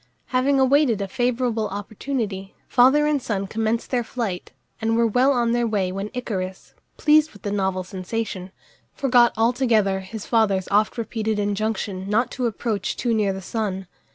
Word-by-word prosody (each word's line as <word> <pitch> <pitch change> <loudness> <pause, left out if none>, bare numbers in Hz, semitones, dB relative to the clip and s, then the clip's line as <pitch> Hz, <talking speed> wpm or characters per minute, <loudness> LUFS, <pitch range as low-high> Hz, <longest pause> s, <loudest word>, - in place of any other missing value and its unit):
Having 270 +2 +3
awaited 265 -4 +3
a 200 - -2
favourable 245 0 0
opportunity, 205 -1 -4
father 265 +4 +5
and 300 -2 +1
son 200 -5 -2
commenced 225 +3 -2
their 245 -2 +1
flight, 220 -7 -4 0.3
and 225 +1 +1
were 235 - +4
well 250 +5 +3
on 240 -3 +1
their 240 0 +1
way 200 -4 0
when 195 +2 -4
Icarus, 190 -6 -4 0.2
pleased 310 0 +4
with 205 - -16
the 205 - -2
novel 190 -2 0
sensation, 190 0 -5 0.4
forgot 245 -3 +4
altogether 225 -4 +2
his 200 +3 -8
father's 200 -5 +2
oft 210 +4 +2
repeated 220 -1 -2
injunction 205 -2 -2
not 230 +4 +1
to 250 -2 -1
approach 215 -2 -2
too 240 -2 0
near 210 -3 +2
the 190 0 -6
sun. 195 -2 -3
220 Hz, 160 wpm, -23 LUFS, 195-245 Hz, 0.4 s, father